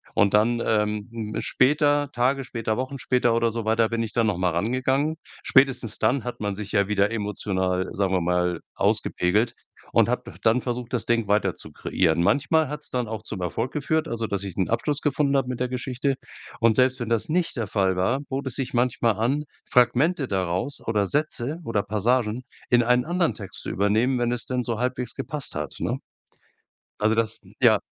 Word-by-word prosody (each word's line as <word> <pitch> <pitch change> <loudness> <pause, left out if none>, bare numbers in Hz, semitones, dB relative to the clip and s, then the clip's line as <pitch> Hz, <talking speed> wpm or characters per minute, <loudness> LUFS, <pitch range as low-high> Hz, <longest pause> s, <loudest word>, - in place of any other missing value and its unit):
Und 100 - +3
dann, 115 +3 +3
ähm, 105 -1 0 0.3
'n - - -1
später 145 +1 +2
Tage 130 +3 +1
später, 115 -3 -3
Wochen 130 +2 -3
später 125 -2 +1
oder 115 0 +2
so 115 0 -3
weiter 110 +1 +2
bin 115 0 -1
ich 115 -1 -3
dann 115 +1 +1
noch 105 -4 0
mal 90 0 +2
rangegangen. 130 - 0 0.3
Spätestens 130 -5 +3
dann 120 +3 +1
hat 125 - -5
man 100 -1 -2
sich 105 0 -5
ja 100 -2 +2
wieder 100 0 +2
emotional, 95 -4 -1
sagen 95 -1 0
wir 90 - +2
mal, 90 0 0
ausgepegelt 105 +7 +1 0.4
und - - +4
habe - - -1
def 85 - -11
dann 115 +4 +2
versucht, 125 0 -4
das 125 - 0
Ding 115 -2 +1
weiter 105 +1 +2
zu - - -11
kreieren. 85 -2 +1
Manchmal 145 - +2
hat's 150 0 -4
dann 125 -2 -2
auch 110 -2 -4
zum 105 -3 -6
Erfolg 115 +8 -2
geführt, 155 +2 0
also, 115 -1 -2
dass 100 -1 -2
ich 95 -3 -5
'n 95 - 0
Abschluss 145 +5 0
gefunden 140 -1 +1
habe 135 - 0
mit 125 - -4
der 125 - 0
Geschichte. 130 +2 -1 0.4
Und 115 -1 +4
selbst 130 +2 +3
wenn 120 -2 -4
das 115 +3 +1
nicht 170 +1 +1
der 115 -3 -2
Fall 95 -2 +1
war, 120 +9 +1
bot 135 +1 -3
es 130 - -2
sich 135 -2 -2
manchmal 120 -2 +2
an, 125 +8 0 0.3
Fragmente 130 +5 +3
daraus 95 +6 -1
oder 105 -3 +1
Sätze 145 - 0
oder 105 -3 0
Passagen 110 +3 0 0.3
in 120 -1 +5
einen 125 +1 +2
anderen 175 0 +1
Text 100 -4 -7
zu - - -4
übernehmen, 110 +6 +1
wenn 120 0 +1
es 120 -3 0
denn 125 -1 -1
so 115 -2 -2
halbwegs 125 -1 -1
gepasst 150 -3 -2
hat, 75 -2 -4
ne? - - -1 1.0
Also, 110 +1 +2
das, 115 -1 0 0.2
ja, - - +6
115 Hz, 200 wpm, -24 LUFS, 105-130 Hz, 1.0 s, ja